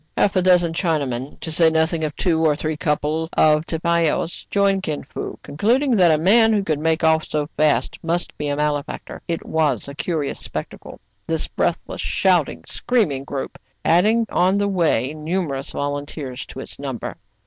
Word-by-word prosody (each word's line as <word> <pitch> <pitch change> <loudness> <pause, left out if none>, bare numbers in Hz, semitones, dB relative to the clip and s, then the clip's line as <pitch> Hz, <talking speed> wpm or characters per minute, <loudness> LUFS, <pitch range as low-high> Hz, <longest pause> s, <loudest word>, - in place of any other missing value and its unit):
Half 200 - +2
a 185 - +3
dozen 180 -2 +4
Chinamen, 145 -7 -2
to 160 - -5
say 165 +1 +5
nothing 160 0 +1
of 150 -2 -2
two 165 -3 +1
or 155 -2 +3
three 155 +1 -2
couple 150 +1 -1
of 155 +1 +3
tipaos, 170 0 0
joined 200 -1 +2
Kin 155 -5 -3
Fo, - - -6
con 145 - -10
cluding 245 - +3
that 180 -4 +5
a 155 - +4
man 220 +8 +5
who 205 -2 +1
could 155 -5 -1
make 160 +1 0
off 160 0 +4
so 150 -1 -2
fast 150 -5 +1
must 170 +1 -2
be 150 - -4
a 145 - 0
malefactor. 150 0 -3
It 165 -1 -3
was 150 -8 0
a 140 - -7
curious 150 -1 -2
spectacle, - - -7 0.3
this 160 -1 -1
breathless, 175 - -2
shout 180 -7 +2
ing, - - -10
screaming 185 - 0
group, 140 -2 -5 0.3
adding 215 +7 +4
on 185 +3 +3
the 205 0 +1
way 165 -7 +1
numer 155 -2 -2
ous 135 - -6
volunteers 145 -2 -4
to 130 - -8
its - - -8
number. 135 -4 -5
160 Hz, 180 wpm, -21 LUFS, 145-180 Hz, 0.3 s, say